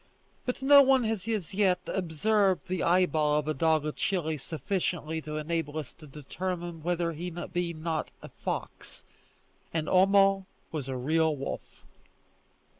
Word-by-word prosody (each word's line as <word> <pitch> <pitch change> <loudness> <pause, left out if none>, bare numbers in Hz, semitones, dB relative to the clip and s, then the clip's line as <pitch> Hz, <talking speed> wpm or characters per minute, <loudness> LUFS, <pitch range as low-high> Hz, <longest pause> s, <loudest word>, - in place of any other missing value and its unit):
But 250 +2 -2
no 280 +1 +9
one 265 -2 +4
has 220 -2 -2
as 210 -8 -2
yet 190 -2 +3
observed 190 +3 +1
the 185 -1 -2
eyeball 160 -4 +3
of 150 0 -1
a 155 - +1
dog 155 0 +2
of 155 - -3
Chili 165 -5 0
sufficiently 160 +2 -3
to 155 0 -5
enable 155 -1 -2
us 150 -4 -5
to 155 - -14
determine 170 +4 -5
whether 170 0 0
he 170 +3 -5
be 175 0 -3
not 155 0 -3
a - - -8
fox, - - -6 0.7
and 160 -2 -2
Homo 195 0 +4 0.2
was 145 -4 -4
a 130 - -2
real 160 +4 +2
wolf. 135 -1 -7
170 Hz, 150 wpm, -29 LUFS, 155-190 Hz, 0.7 s, no